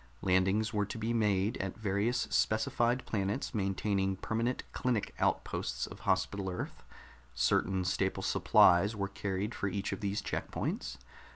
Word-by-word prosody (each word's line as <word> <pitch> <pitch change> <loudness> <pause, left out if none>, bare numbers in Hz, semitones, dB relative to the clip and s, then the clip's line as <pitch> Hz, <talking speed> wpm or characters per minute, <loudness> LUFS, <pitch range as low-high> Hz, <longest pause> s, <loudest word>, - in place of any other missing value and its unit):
Landings 95 +4 +2
were 105 -1 +1
to 110 - -6
be 115 +1 -1
made 105 -2 +1
at 95 +2 -4
various 105 +3 0
specified 120 +3 +1
planets 100 +6 -2
maintaining 95 -1 0
permanent 115 +6 -1
clinic 120 -5 -1
outposts - - -1
of - - -10
Hospital 100 -2 +1
Earth; 90 - -5 0.5
certain 95 -2 +2
staple 95 +1 0
supplies 100 +5 +5
were 100 -1 -1
carried 100 0 -3
for 100 - -2
each 100 0 -2
of - - -3
these 100 0 -1
check - - -3
points. - - -3
100 Hz, 145 wpm, -32 LUFS, 95-110 Hz, 0.5 s, supplies